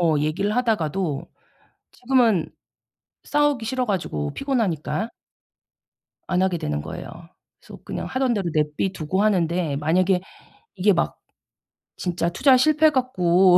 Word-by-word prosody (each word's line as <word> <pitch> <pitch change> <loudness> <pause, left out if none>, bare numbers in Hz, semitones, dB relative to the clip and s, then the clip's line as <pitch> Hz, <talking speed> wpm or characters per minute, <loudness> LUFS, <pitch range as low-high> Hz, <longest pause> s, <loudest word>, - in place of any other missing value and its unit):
어 165 -3 +3
얘기를 180 +8 0
하다가도 190 - 0 0.7
지금은 240 -9 +2 0.7
싸우기 295 -5 +1
싫어 255 +2 -1
가지고 75 - -2
피곤하니까 220 - -1 1.2
안 185 0 +1
하게 185 -3 +1
되는 75 - -3
거예요. - - -7 0.5
그래서 - - -13
그냥 - - -5
하던 260 -2 0
대로 190 -5 -1
내비 150 +5 0
두고 185 +4 -1
하는데 170 -7 +1
만약에 180 +5 +2 0.6
이게 195 +1 +3
막 170 - -1 0.8
진짜 175 -1 -1
투자 260 +8 +4
실패해 310 +3 +4
갖고 185 - +4
185 Hz, 280 characters per minute, -23 LUFS, 165-240 Hz, 1.2 s, 투자